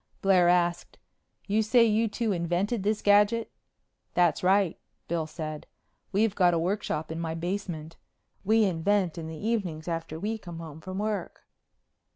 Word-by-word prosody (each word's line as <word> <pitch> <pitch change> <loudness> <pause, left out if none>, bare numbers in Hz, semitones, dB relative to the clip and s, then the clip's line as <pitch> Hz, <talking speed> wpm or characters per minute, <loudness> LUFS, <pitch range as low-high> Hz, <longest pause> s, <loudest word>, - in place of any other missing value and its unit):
Blair 185 -3 +5
asked, 175 -1 +1 0.5
"You 215 +2 +2
say 230 +2 +4
you 225 +1 +2
two 220 +1 -1
invented 180 +5 0
this 210 +2 -1
gadget?" 210 +3 +4 0.6
"That's 175 -3 +3
right," 190 -1 +2 0.3
Bill 165 -2 -1
said. 155 -1 -6 0.4
"We've 210 +1 +2
got 180 -4 +3
a - - +2
workshop 170 -3 -2
in 160 - -4
my 165 -1 -3
basement. 170 -2 -4 0.5
We 220 +3 +4
invent 185 0 +1
in 160 - -6
the 160 0 -7
evenings 190 -8 -2
after 165 -2 -4
we 220 +4 -2
come 175 -5 -9
home 160 -2 -9
from 185 +3 -6
work." 205 -3 -3
180 Hz, 155 wpm, -28 LUFS, 165-210 Hz, 0.6 s, Blair